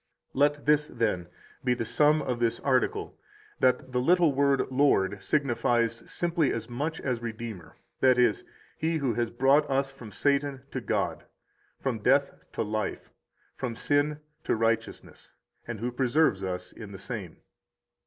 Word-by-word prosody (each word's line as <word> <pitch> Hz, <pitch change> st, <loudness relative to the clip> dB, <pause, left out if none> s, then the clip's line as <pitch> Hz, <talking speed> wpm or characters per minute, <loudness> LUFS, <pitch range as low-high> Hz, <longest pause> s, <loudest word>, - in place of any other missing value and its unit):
31 -, -, -5 dB
Let 145 Hz, -, -17 dB
this, 150 Hz, 0 st, +3 dB
then, 90 Hz, -7 st, -1 dB, 0.4 s
be 125 Hz, -1 st, +2 dB
the 115 Hz, -, -3 dB
sum 150 Hz, +6 st, +3 dB
of 125 Hz, -2 st, -2 dB
this 115 Hz, -1 st, +1 dB
article 130 Hz, -2 st, 0 dB, 0.4 s
that 130 Hz, 0 st, +2 dB
the 125 Hz, 0 st, +1 dB
little 170 Hz, +1 st, +4 dB
word 140 Hz, 0 st, +3 dB
Lord 100 Hz, -8 st, +2 dB
signifies 120 Hz, -4 st, +1 dB
simply 170 Hz, -3 st, +1 dB
as 115 Hz, -1 st, -3 dB
much 145 Hz, +7 st, -3 dB
as 125 Hz, -3 st, -2 dB
Redeemer, 110 Hz, -6 st, -7 dB, 0.2 s
i.e., 125 Hz, -2 st, +5 dB, 0.5 s
He 160 Hz, +1 st, 0 dB
who 135 Hz, -6 st, 0 dB
has 120 Hz, +1 st, -1 dB
brought 135 Hz, +5 st, +3 dB
us 135 Hz, 0 st, +1 dB
from 125 Hz, -6 st, -11 dB
Satan 140 Hz, +2 st, 0 dB
to -, -, -3 dB
God, -, -, -2 dB, 0.5 s
from 125 Hz, -5 st, -2 dB
death 135 Hz, +6 st, +1 dB
to -, -, -1 dB
life, 110 Hz, 0 st, -3 dB, 0.4 s
from 125 Hz, -3 st, -4 dB
sin 145 Hz, +4 st, +1 dB, 0.2 s
to -, -, +1 dB
righteousness, 115 Hz, 0 st, -2 dB, 0.3 s
and 115 Hz, -3 st, -5 dB
who 120 Hz, +3 st, -2 dB
preserves 130 Hz, -4 st, +2 dB
us 90 Hz, -1 st, -4 dB
in 105 Hz, -3 st, -10 dB
the -, -, -7 dB
same. 95 Hz, -3 st, -6 dB
125 Hz, 155 wpm, -28 LUFS, 115-140 Hz, 0.5 s, i.e